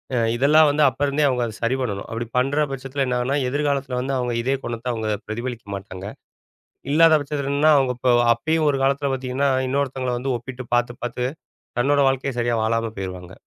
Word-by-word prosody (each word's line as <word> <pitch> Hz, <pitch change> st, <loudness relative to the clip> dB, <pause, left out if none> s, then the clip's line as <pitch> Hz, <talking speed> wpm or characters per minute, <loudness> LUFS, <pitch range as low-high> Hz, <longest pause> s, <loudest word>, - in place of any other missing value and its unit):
அ -, -, +1 dB, 0.2 s
இதெல்லாம் 150 Hz, +5 st, +5 dB
வந்து 150 Hz, +1 st, +2 dB
அப்பருந்தே 140 Hz, +2 st, 0 dB
அவங்க 125 Hz, -2 st, 0 dB
அதை 110 Hz, -, -5 dB
சரி 115 Hz, +3 st, +1 dB
பண்ணணும். 100 Hz, -6 st, -3 dB
அப்படி 115 Hz, +1 st, -3 dB
பண்ற 145 Hz, +4 st, +2 dB
பட்சத்தில 135 Hz, +1 st, -3 dB
என்ன 125 Hz, -1 st, -1 dB
ஆகும்னா, 130 Hz, +3 st, 0 dB
எதிர்காலத்தில 140 Hz, -2 st, -1 dB
வந்து 135 Hz, +2 st, -2 dB
அவங்க 125 Hz, -1 st, -1 dB
இதே 135 Hz, +3 st, 0 dB
குணத்த 120 Hz, +1 st, -3 dB
அவங்க 110 Hz, -1 st, -3 dB, 0.2 s
பிரதிபலிக்க 120 Hz, +1 st, -5 dB
மாட்டாங்க. 95 Hz, -1 st, -8 dB, 0.9 s
இல்லாத 160 Hz, 0 st, +6 dB
பட்சத்தில 140 Hz, -1 st, -3 dB
என்னன்னா 150 Hz, +2 st, +4 dB
அவங்க 130 Hz, -2 st, +2 dB
இப்ப 125 Hz, 0 st, 0 dB, 0.2 s
அப்பயும் 155 Hz, +6 st, 0 dB
ஒரு 140 Hz, -, +1 dB
காலத்தில 140 Hz, +1 st, +1 dB
பாத்தீங்கன்னா 130 Hz, +2 st, -1 dB, 0.2 s
இன்னொருத்தங்கள 130 Hz, -2 st, -1 dB
வந்து 130 Hz, +1 st, -2 dB
ஒப்பிட்டு 125 Hz, +1 st, -8 dB
பாத்து, 120 Hz, 0 st, +1 dB
பாத்து 125 Hz, +1 st, -2 dB, 0.5 s
தன்னோட 140 Hz, +3 st, +3 dB
வாழ்க்கையே 135 Hz, -1 st, -2 dB
சரியா 120 Hz, 0 st, +1 dB
வாழாம 115 Hz, 0 st, 0 dB
போயிருவாங்க. 90 Hz, -1 st, -6 dB
130 Hz, 180 wpm, -22 LUFS, 120-140 Hz, 0.9 s, இல்லாத